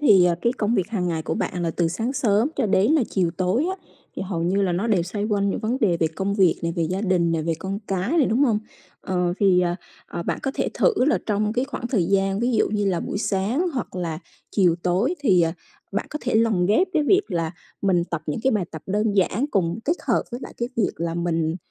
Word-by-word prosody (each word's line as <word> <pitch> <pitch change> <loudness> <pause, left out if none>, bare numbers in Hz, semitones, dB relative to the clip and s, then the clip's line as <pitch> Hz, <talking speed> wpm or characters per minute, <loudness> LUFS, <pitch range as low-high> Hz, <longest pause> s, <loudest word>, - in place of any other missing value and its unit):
thì, 200 -11 +6
ờ, 175 -1 +3
cái 235 - +2
công 230 -2 0
việc 190 -1 0
hàng 185 -6 -1
ngày 160 -2 -2
của - - -2
bạn 180 -3 -2
là 165 - 0
từ 165 0 0
sáng 225 +9 -2
sớm 235 -2 +2
cho - - +1
đến 200 +8 +3
là 305 -5 +4
chiều 180 -4 +1
tối 195 - +1
á, 380 - -3 0.4
thì - - -3
hầu 180 -3 -3
như 190 +4 +1
là 180 -2 +1
nó 190 +7 -1
đều 195 -6 +2
xoay 205 +4 -3
quanh 200 -2 +1
những - - -3
vấn 235 +4 -1
đề 180 -6 +3
về 165 - +1
công 190 +5 -2
việc 190 -5 +3
này, 170 0 -1
về 170 - +1
gia 185 +4 -1
đình 180 -5 +1
nè, 160 -1 0
về 165 +1 0
con 195 +3 -4
cái 190 +5 -1
này, 280 - +4
đúng 250 +6 +3
hông? 220 -5 +2 0.4
Ờ, 180 -2 0
thì, 185 -3 +5
ờ, 175 -1 +1 0.3
ờ, 170 - -5
bạn - - -2
có 270 - 0
thể - - 0
thử 485 - +3
là 305 - +3
trong 210 0 0
cái 250 +2 0
khoảng 275 -3 -5
thời 215 -9 +1
gian 195 +2 +1
ví 245 +1 +1
dụ - - +2
như 205 -1 0
là 175 -3 0
buổi - - -3
sáng 220 - 0
hoặc 225 -6 -4
là 165 -3 -3 0.3
chiều 180 -5 +3
tối 195 - +1
thì, 190 -10 +4
ờ, 165 0 +1 0.4
bạn - - -2
có 300 - -4
thể - - -1
lồng 220 -6 +3
ghép 355 - +3
cái 310 -3 +2
việc 390 +6 +4
là 165 -1 -1 0.3
mình 180 -3 +2
tập 170 -3 -4
những 150 +8 -2
cái 265 - +3
bài 210 -6 +1
tập 160 -1 -8
đơn 210 +2 +1
giản, 205 +8 +2
cùng 175 0 0
kết 330 +4 +1
hợp - - +3
với 240 +2 -5
lại - - -8
cái 235 0 -2
việc 220 - +2
là 165 0 -2
mình 165 -1 0
195 Hz, 265 wpm, -23 LUFS, 175-225 Hz, 0.4 s, thì